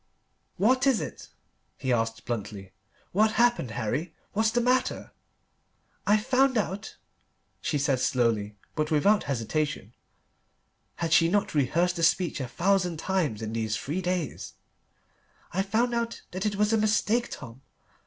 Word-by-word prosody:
"What 255 Hz, +6 st, +3 dB
is 265 Hz, -5 st, +4 dB
it?" -, -, -7 dB, 0.5 s
he 130 Hz, -3 st, 0 dB
asked 115 Hz, -1 st, -1 dB
bluntly. 100 Hz, -4 st, -5 dB, 0.4 s
"What's 215 Hz, +3 st, +3 dB
happened, 240 Hz, -, +2 dB
Harry? 120 Hz, +9 st, -3 dB, 0.2 s
What's 220 Hz, +1 st, +2 dB
the 240 Hz, -, +1 dB
matter?" 250 Hz, +2 st, 0 dB, 1.0 s
"I've 210 Hz, +1 st, +3 dB
found 260 Hz, 0 st, +3 dB
out," 205 Hz, +1 st, -3 dB, 0.6 s
she 150 Hz, -, 0 dB
said 140 Hz, -2 st, +1 dB
slowly, 115 Hz, -5 st, +1 dB, 0.2 s
but 155 Hz, -1 st, -1 dB
without 195 Hz, +7 st, +3 dB
hesitation: 140 Hz, +4 st, -2 dB, 1.0 s
had 165 Hz, -1 st, -1 dB
she 165 Hz, +2 st, +5 dB
not 205 Hz, +2 st, +1 dB
rehearsed 170 Hz, +5 st, +1 dB
the 165 Hz, -, -1 dB
speech 170 Hz, 0 st, +2 dB
a 130 Hz, -, -3 dB
thousand 180 Hz, +3 st, +1 dB
times 155 Hz, -, -1 dB
in 110 Hz, 0 st, -4 dB
these 110 Hz, -2 st, -1 dB
three 160 Hz, +7 st, -3 dB
days? 180 Hz, -4 st, -3 dB, 1.0 s
"I've 190 Hz, +2 st, 0 dB
found 235 Hz, +4 st, +2 dB
out 235 Hz, 0 st, -2 dB
that 185 Hz, +3 st, -2 dB
it 205 Hz, -, -1 dB
was 210 Hz, +2 st, +2 dB
a 220 Hz, -, +3 dB
mistake, 215 Hz, +2 st, +2 dB
Tom. 125 Hz, -1 st, -9 dB
175 Hz, 145 wpm, -27 LUFS, 130-215 Hz, 1.0 s, she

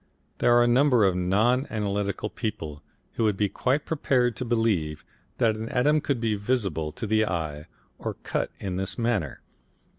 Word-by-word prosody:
There 120 Hz, -, +5 dB
are 120 Hz, -, +6 dB
a -, -, +3 dB
number 125 Hz, -2 st, +4 dB
of 95 Hz, -2 st, +2 dB
non 110 Hz, +9 st, +2 dB
analytical 100 Hz, -1 st, -2 dB
people 80 Hz, -, -5 dB, 0.3 s
who -, -, -1 dB
would 105 Hz, -3 st, +1 dB
be 105 Hz, -, +2 dB
quite 135 Hz, +8 st, 0 dB
prepared 125 Hz, -6 st, +1 dB
to -, -, -2 dB
believe 105 Hz, -11 st, 0 dB, 0.3 s
that 110 Hz, -2 st, +2 dB
an 110 Hz, +1 st, -5 dB
atom 145 Hz, +4 st, +2 dB
could 140 Hz, -4 st, -1 dB
be 115 Hz, -2 st, 0 dB
visible 100 Hz, -, -1 dB
to -, -, -5 dB
the 110 Hz, +1 st, +2 dB
eye 80 Hz, -6 st, -3 dB, 0.3 s
or -, -, -4 dB
cut -, -, -1 dB
in 95 Hz, -2 st, -3 dB
this 95 Hz, 0 st, -2 dB
manner. 115 Hz, -, -1 dB
110 Hz, 175 wpm, -26 LUFS, 95-120 Hz, 0.3 s, are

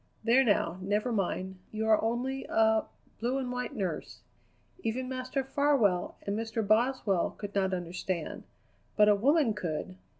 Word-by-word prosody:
There, 240 Hz, +4 st, +5 dB
now, 195 Hz, -6 st, +1 dB
never 210 Hz, +5 st, 0 dB
mind. 190 Hz, -2 st, -2 dB
You 220 Hz, 0 st, -2 dB
are 215 Hz, -1 st, +4 dB
only 250 Hz, +4 st, -1 dB
a 220 Hz, 0 st, +3 dB, 0.3 s
blue 245 Hz, +4 st, 0 dB
and 255 Hz, -2 st, -3 dB
white 250 Hz, -1 st, -4 dB
nurse. 185 Hz, -7 st, -4 dB, 0.6 s
Even 255 Hz, -4 st, -2 dB
Master 255 Hz, +1 st, -2 dB
Farwell 265 Hz, -10 st, +2 dB
and 200 Hz, -, -1 dB
Mr. 225 Hz, -1 st, -2 dB
Boswell 215 Hz, -4 st, +2 dB
could 205 Hz, -1 st, -6 dB
not 190 Hz, -1 st, +1 dB
understand; 180 Hz, -1 st, -4 dB, 0.5 s
but 210 Hz, 0 st, +6 dB
a -, -, +7 dB
woman 265 Hz, +3 st, +3 dB
could. 155 Hz, -, -4 dB
220 Hz, 145 wpm, -30 LUFS, 195-255 Hz, 0.6 s, a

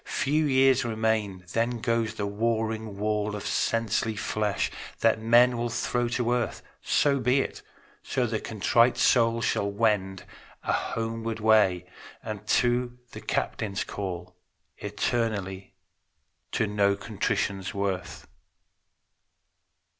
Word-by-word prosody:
Few 150 Hz, +2 st, +2 dB
years 130 Hz, -1 st, +4 dB
remain; 110 Hz, -5 st, -1 dB
then 115 Hz, +1 st, 0 dB
goes 115 Hz, -1 st, 0 dB
the 105 Hz, -, -2 dB
warring 110 Hz, 0 st, -1 dB
wall 105 Hz, 0 st, -1 dB
Of 105 Hz, -, -6 dB
sensely 115 Hz, -1 st, 0 dB
flesh, 105 Hz, -1 st, -1 dB, 0.3 s
that 110 Hz, -1 st, +3 dB
men 120 Hz, +2 st, +5 dB
will 120 Hz, 0 st, -1 dB
throw 120 Hz, +1 st, -1 dB
to 120 Hz, 0 st, 0 dB
earth. 120 Hz, -2 st, -2 dB, 0.2 s
So 140 Hz, -2 st, +2 dB
be 125 Hz, +2 st, +3 dB
it; -, -, -5 dB, 0.4 s
so 125 Hz, -, -1 dB
the 110 Hz, -2 st, -1 dB
contrite 115 Hz, +3 st, +2 dB
soul 115 Hz, -1 st, +3 dB
shall 100 Hz, -, +1 dB
wend 100 Hz, -3 st, 0 dB, 0.4 s
A -, -, 0 dB
homeward 115 Hz, 0 st, -2 dB
way 105 Hz, -5 st, +4 dB, 0.4 s
unto 120 Hz, +3 st, 0 dB
the -, -, -9 dB
Captain's 100 Hz, -3 st, -2 dB
call, 90 Hz, -2 st, -6 dB, 0.4 s
Eternally 100 Hz, -3 st, -2 dB, 0.8 s
to 110 Hz, -, +2 dB
know 100 Hz, -1 st, +2 dB
contrition's 100 Hz, -2 st, -2 dB
worth. 100 Hz, -2 st, -3 dB
110 Hz, 115 wpm, -27 LUFS, 100-120 Hz, 0.8 s, men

